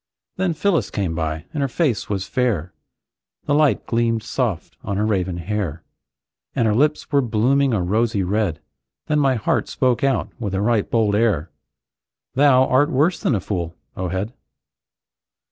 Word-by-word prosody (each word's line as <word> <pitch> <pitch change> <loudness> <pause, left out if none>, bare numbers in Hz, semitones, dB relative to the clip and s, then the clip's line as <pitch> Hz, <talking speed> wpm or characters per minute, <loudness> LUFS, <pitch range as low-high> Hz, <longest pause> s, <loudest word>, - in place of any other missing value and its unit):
Then 185 -3 0
Phyllis 165 - +1
came 95 -5 -2
by, 80 0 -3
and 150 - -2
her 140 - +1
face 130 - -1
was 100 -2 -2
fair, 115 - -1 0.7
The 145 - +1
light 150 -1 +3
gleamed 115 -1 0
soft 115 -6 -2
on 100 - -3
her 105 - +1
raven 95 -4 0
hair; 90 -3 -3 0.7
And 115 - +2
her 105 - +2
lips 150 +8 +1
were 140 -1 +4
blooming 130 +4 +2
a 100 -6 +1
rosy 105 +2 +1
red. 100 -3 -1 0.4
Then 150 0 +1
my 135 -2 +3
heart 110 - 0
spoke 130 +1 0
out 135 -1 +1
with 100 -5 -3
a 95 - 0
right 110 -1 +1
bold 110 -3 +2
air: 100 -7 +1 0.8
"Thou 130 -1 +5
art 145 +4 +3
worse 160 +5 +2
than 125 - +1
a - - 0
fool, 85 -3 -4 0.2
O 95 - -3
head!" 95 +6 -3
110 Hz, 165 wpm, -21 LUFS, 95-135 Hz, 0.8 s, Thou